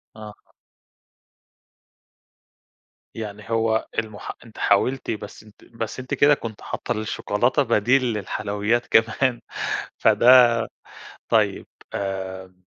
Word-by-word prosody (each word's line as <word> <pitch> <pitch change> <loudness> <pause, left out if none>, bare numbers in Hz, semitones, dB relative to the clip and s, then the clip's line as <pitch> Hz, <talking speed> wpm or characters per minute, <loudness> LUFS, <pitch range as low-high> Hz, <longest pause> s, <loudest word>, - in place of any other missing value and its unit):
آه. 105 -1 -13 2.6
يعني 105 -1 -7
هو 115 -1 +1
المح 110 -2 -6
أنتِ 110 - -16
حاولتِ 130 -2 +1
بس 105 0 -7
أنتِ 105 -1 -20
بس 115 +1 -6
أنتِ 130 - -6
كده 145 +1 +5
كنتِ 115 -6 -6
حاطة - - -5
الشوكولاتة 115 +4 0
بديل 120 +3 +3
للحلويات، 105 +3 -1
كمان 115 +3 +2 0.6
فده 120 -1 +5 0.6
طيّب - - +1 0.3
آآ 95 -1 -5
110 Hz, 95 wpm, -23 LUFS, 105-120 Hz, 2.6 s, كده